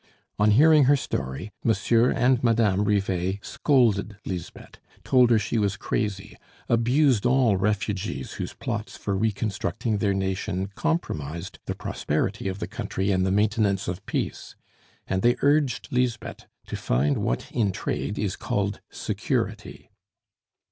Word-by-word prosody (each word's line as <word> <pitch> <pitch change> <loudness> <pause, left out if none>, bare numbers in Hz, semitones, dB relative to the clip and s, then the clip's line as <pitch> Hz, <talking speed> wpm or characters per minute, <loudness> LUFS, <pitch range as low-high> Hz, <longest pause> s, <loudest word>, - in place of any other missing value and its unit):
On 105 +1 +4
hearing 150 +6 +6
her 145 +2 +5
story, 70 - -4
Monsieur 115 +1 +3
and 125 0 +2
Madame 110 -4 +3
Rivet 95 -1 0
scolded 110 -7 +2
Lisbeth, 90 -3 -7 0.2
told 125 -2 +4
her 115 - +5
she 110 +2 -1
was 100 -2 0
crazy, 100 -1 -3 0.3
abused 120 0 +3
all 125 -4 +3
refugees 100 -5 -2
whose - - -5
plots - - -4
for 100 - -2
reconstructing 105 0 -1
their 100 -2 +1
nation 95 0 -2
compromised 85 - -3
the - - -2
prosperity - - -2
of 95 0 -3
the - - -4
country 95 +2 -2
and 95 0 +2
the - - +1
maintenance 105 -1 +1
of 90 +1 -4
peace; - - -3 0.5
and 95 - -1
they 120 +3 +4
urged 145 -2 +2
Lisbeth 125 -2 -2 0.2
to - - -5
find 70 +4 +1
what - - -2
in 110 -5 +1
trade 105 +1 -3
is 100 -3 -1
called 100 0 -2
security. - - -3
105 Hz, 135 wpm, -25 LUFS, 95-120 Hz, 0.5 s, hearing